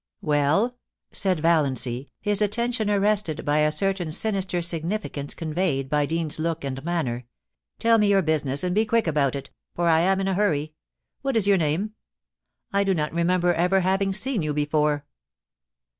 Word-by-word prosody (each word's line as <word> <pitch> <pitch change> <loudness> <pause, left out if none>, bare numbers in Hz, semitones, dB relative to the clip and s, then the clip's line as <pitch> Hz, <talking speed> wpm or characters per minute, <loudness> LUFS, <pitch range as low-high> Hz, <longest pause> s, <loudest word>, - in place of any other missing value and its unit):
* - - -57
Well,' 155 +12 +1 0.3
said 185 -5 0
Vallancy, 140 -6 0
his 205 0 +2
attention 220 +1 0
arrested 200 -5 0
by 145 +1 +2
a 150 0 +3
certain 190 -2 -1
sinister 190 -1 0
significance 165 -3 -3
conveyed 155 -5 -2
by 150 -1 +2
Deans's 160 -1 0
look 165 0 -2
and 135 -1 -5
manner, 130 -8 -2 0.3
* - - -61
tell 230 0 +4
me 210 - +3
your 195 -1 +3
business, 145 -2 0
and 180 0 0
be 215 +3 +3
quick 225 +1 +1
about 145 -4 +1
it, 140 - -7 0.2
for 175 0 0
I 160 -1 +4
am 190 +3 +2
in 195 - -1
a 195 - +1
hurry. 155 -6 0 0.5
WTiat 270 -2 -1
is 220 -3 +4
your 200 -1 +5
name? 170 +7 -1 0.8
I 200 0 +3
do 195 -1 +1
not 150 -1 -2
remember 175 +1 +2
ever 180 +3 +2
having 195 +2 +1
seen 220 +2 0
you 150 -2 -2
before.' 150 -1 0
170 Hz, 175 wpm, -24 LUFS, 150-200 Hz, 0.8 s, your